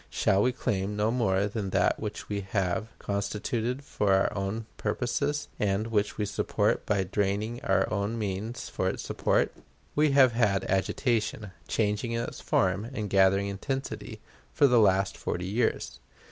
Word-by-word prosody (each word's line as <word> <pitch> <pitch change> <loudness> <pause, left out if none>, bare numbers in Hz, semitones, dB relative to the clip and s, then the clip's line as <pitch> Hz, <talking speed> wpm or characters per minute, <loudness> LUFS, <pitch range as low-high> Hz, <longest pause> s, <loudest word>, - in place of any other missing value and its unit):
Shall 95 +1 +2
we 125 - +3
claim 105 -5 -2
no 105 +2 +1
more 105 -5 +1
from 105 -2 -3
that 95 -1 +2
which 105 -1 -5
we 100 -1 -2
have 95 +1 -1
constituted 110 +5 -2
for 105 -7 0
our 95 - +1
own 100 +3 -2
purposes, 125 +7 -1
and 100 +1 +1
which 105 -2 0
we 105 - 0
support 105 - 0
by 100 -2 +2
draining 105 +5 -1
our 95 - +2
own 100 +3 -1
means 110 +3 -3
for 95 - -1
its - - -4
support? - - +1 0.4
We 150 +1 +3
have 135 -3 +6
had 110 -5 +2
agitation, 105 +1 0 0.2
changing 110 +2 0
in 115 - 0
its - - -7
form, 95 +3 +1
and 110 -6 -4
gathering 95 0 +4
intensity, 110 +1 -4 0.3
for 145 - +4
the 125 -3 +5
last 100 -2 +3
forty 90 0 -3
years. 110 +5 -1
105 Hz, 160 wpm, -28 LUFS, 100-115 Hz, 0.4 s, have